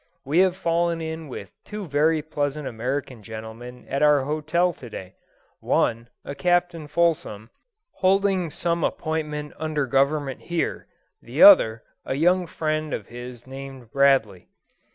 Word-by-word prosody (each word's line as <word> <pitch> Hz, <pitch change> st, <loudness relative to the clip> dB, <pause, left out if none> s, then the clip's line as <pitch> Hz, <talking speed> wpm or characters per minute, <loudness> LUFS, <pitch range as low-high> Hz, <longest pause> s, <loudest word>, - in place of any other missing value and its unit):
We 150 Hz, +6 st, +2 dB
have 185 Hz, -1 st, +4 dB
fallen 170 Hz, -1 st, 0 dB
in 160 Hz, -1 st, -5 dB
with 100 Hz, -8 st, -8 dB
two 210 Hz, -1 st, -6 dB
very 155 Hz, +1 st, +2 dB
pleasant 145 Hz, -2 st, -3 dB
American 125 Hz, +1 st, -4 dB
gentlemen 110 Hz, +3 st, -9 dB
at 140 Hz, -, -2 dB
our 150 Hz, -1 st, +5 dB
hotel 155 Hz, +4 st, 0 dB
to 125 Hz, -5 st, -11 dB
day 95 Hz, -3 st, -8 dB, 0.5 s
one, 115 Hz, +1 st, 0 dB, 0.2 s
a -, -, -5 dB
Captain 175 Hz, -1 st, 0 dB
Fulsom, 150 Hz, -10 st, 0 dB, 0.5 s
holding 190 Hz, -2 st, +2 dB
some 170 Hz, +2 st, -1 dB
appointment 150 Hz, -2 st, -3 dB
under 155 Hz, -2 st, -1 dB
Government 140 Hz, +1 st, 0 dB
here; 170 Hz, -1 st, -3 dB, 0.3 s
the -, -, +1 dB
other, 115 Hz, -, +8 dB, 0.2 s
a -, -, -3 dB
young 175 Hz, +4 st, +2 dB
friend 155 Hz, -1 st, -2 dB
of 105 Hz, -, -9 dB
his 120 Hz, 0 st, -9 dB
named 135 Hz, -3 st, -10 dB
Bradley. 135 Hz, -9 st, +2 dB
150 Hz, 135 wpm, -24 LUFS, 125-165 Hz, 0.5 s, other